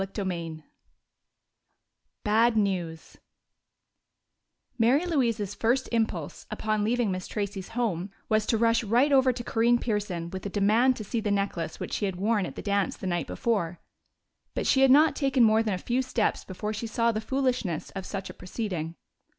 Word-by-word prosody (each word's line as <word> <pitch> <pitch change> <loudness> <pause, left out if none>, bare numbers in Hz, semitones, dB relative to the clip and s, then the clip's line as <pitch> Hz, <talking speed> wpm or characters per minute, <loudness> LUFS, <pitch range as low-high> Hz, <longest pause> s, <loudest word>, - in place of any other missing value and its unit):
Chapter 195 +1 -4
XIV 165 -4 -4 1.6
Bad 225 +2 +3
News 180 -6 -2 1.6
Mary 255 +9 +4
Louise's 230 - 0
first 245 +4 +1
impulse, 220 -10 -2
upon 215 -1 -1
leaving 230 -1 +1
Miss 185 0 -4
Tracey's 200 -2 -4
home, 200 -6 -1 0.2
was 215 -1 +1
to 225 - +2
rush 230 +1 +3
right 240 +7 +3
over 265 -2 +5
to 245 -1 -6
Corinne 235 +1 +3
Pearson 200 -8 -3
with 190 - -6
a 200 - -3
demand 215 +6 +3
to 215 - -6
see 225 +3 -2
the 215 -1 -2
necklace 200 -5 -2
which - - -5
she 205 - 0
had 190 -2 -2
worn 205 0 +1
at - - -9
the - - -7
dance 200 -1 0
the - - -8
night 175 -5 -1
before. 180 -7 -1 0.8
But - - -1
she 265 - +3
had 270 - +6
not 300 +4 +6
taken 270 -3 +2
more 220 0 +5
than 215 -4 0
a - - -3
few 245 +7 0
steps 250 -4 0
before 210 +3 -4
she 220 +2 -4
saw 230 +1 +1
the 215 -1 -3
foolishness 250 - -1
of 195 -1 -6
such 195 -1 -4
a - - -8
proceeding. 180 -4 -4
215 Hz, 175 wpm, -27 LUFS, 190-235 Hz, 1.6 s, had